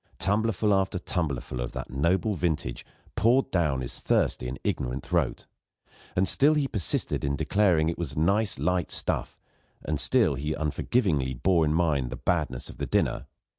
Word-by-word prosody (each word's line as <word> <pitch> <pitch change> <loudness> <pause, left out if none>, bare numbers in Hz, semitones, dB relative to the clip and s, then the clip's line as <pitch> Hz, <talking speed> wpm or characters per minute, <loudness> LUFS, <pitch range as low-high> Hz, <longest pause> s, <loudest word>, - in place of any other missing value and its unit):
Tumbler 105 +5 +1
full 105 +1 +1
after 95 -1 +1
tumbler 80 -8 -2
full 60 - -6
of - - -4
that - - -6
noble 85 - +1
vintage 80 -8 -2 0.3
poured 125 +5 +3
down 75 -8 +1
his - - -5
thirsty 60 - +1
and 65 +1 -5
ignorant 65 0 -2
throat; - - -1 0.7
and 95 +1 +2
still 150 +3 +4
he 145 -2 +1
persisted 105 -10 -1
in 70 0 0
declaring 90 0 +2
that 80 - +1
it 85 - -8
was 80 -6 -4
nice 100 +6 +2
light 90 -1 0
stuff, - - -1 0.5
and 75 -2 -1
still - - +3
he 75 +3 -3
unforgivingly 75 - 0
bore 85 +4 +2
in 75 - +1
mind 75 -7 +1
the - - -5
badness 75 -8 -1
of - - -10
the - - -3
dinner. - - 0
85 Hz, 175 wpm, -27 LUFS, 70-95 Hz, 0.7 s, still